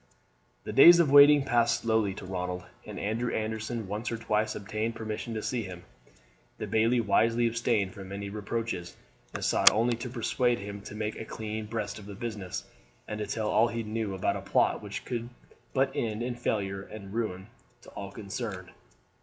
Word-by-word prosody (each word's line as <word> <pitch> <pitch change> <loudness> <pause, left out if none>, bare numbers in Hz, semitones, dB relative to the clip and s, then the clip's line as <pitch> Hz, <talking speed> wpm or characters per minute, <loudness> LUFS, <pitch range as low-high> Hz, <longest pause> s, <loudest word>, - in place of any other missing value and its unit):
The - - -5
days 175 0 +9
of 160 -5 +4
waiting 145 0 +8
passed 120 -2 +2
slowly 110 -4 +1
to 100 - -8
Ronald, 90 -1 -3 0.2
and - - -6
Andrew 115 +4 -1
Anderson 110 0 -3
once 105 +5 -3
or 115 - -2
twice 110 -1 0
obtained 110 +3 -3
permission 110 +1 -4
to 110 - -3
see 125 -2 -1
him. 90 -4 -8 0.7
The - - -4
bailie 115 +3 +2
wisely 115 +2 +3
abstained 115 -4 +1
from 95 -1 -9
any 100 0 -4
reproaches, 105 -3 -4 0.4
and - - -2
sought - - +7
only 115 +2 +2
to 125 +2 -5
persuade 120 0 +1
him 100 -1 -7
to 105 - -8
make 105 0 -3
a 110 - -6
clean 110 0 -5
breast 105 -1 -4
of 100 - -11
the 100 - -8
business, 105 -5 -5 0.4
and 105 0 -4
to 105 - -3
tell 110 -2 -1
all 115 - +5
he 115 0 -3
knew 110 -2 -3
about 95 - 0
a - - -4
plot - - +2
which - - -6
could 120 -1 -3 0.4
but 135 +1 +2
end 110 0 -2
in 125 0 -2
failure 100 -5 -2
and 100 -1 -10
ruin 100 -5 -2 0.4
to - - -13
all 100 -1 -7
concerned. 100 -3 -6
110 Hz, 185 wpm, -29 LUFS, 100-115 Hz, 0.7 s, days